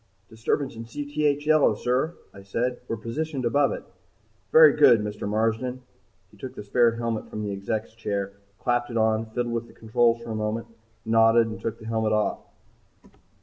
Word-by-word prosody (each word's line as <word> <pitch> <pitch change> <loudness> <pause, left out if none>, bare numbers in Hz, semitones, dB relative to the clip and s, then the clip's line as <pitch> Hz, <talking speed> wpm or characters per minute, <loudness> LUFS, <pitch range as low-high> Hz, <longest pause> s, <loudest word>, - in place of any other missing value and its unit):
"Disturbance 115 +4 -2
in 115 +1 -7
Cth 145 +3 -1
yellow, 155 -7 +4
sir," 130 +9 -1 0.2
I 100 - -12
said. 120 +6 -2
"We're 115 - -3
positioned 135 +5 -4
above 140 +4 +3
it." - - -5 0.7
"Very 155 -3 +8
good, 135 -6 +6
Mr. 105 -1 -4
Marsden." 115 +4 -1 0.5
He - - -19
took - - -8
the - - -7
spare 115 +3 +3
helmet 115 -1 -3
from 105 - -5
the 105 - -3
Exec's 105 +3 -3
chair, 100 -3 -3 0.2
clapped 120 +3 0
it 115 - -3
on, 110 0 +1
fiddled 120 +1 -3
with 115 0 -3
the - - -17
controls 115 +1 +1
for 115 - -7
a - - -3
moment, 110 +2 -2 0.4
nodded, 115 +1 +5
and 110 - -7
took 115 - -3
the 110 - -13
helmet 110 -1 0
off. 105 -1 0
115 Hz, 180 wpm, -25 LUFS, 110-125 Hz, 0.7 s, Very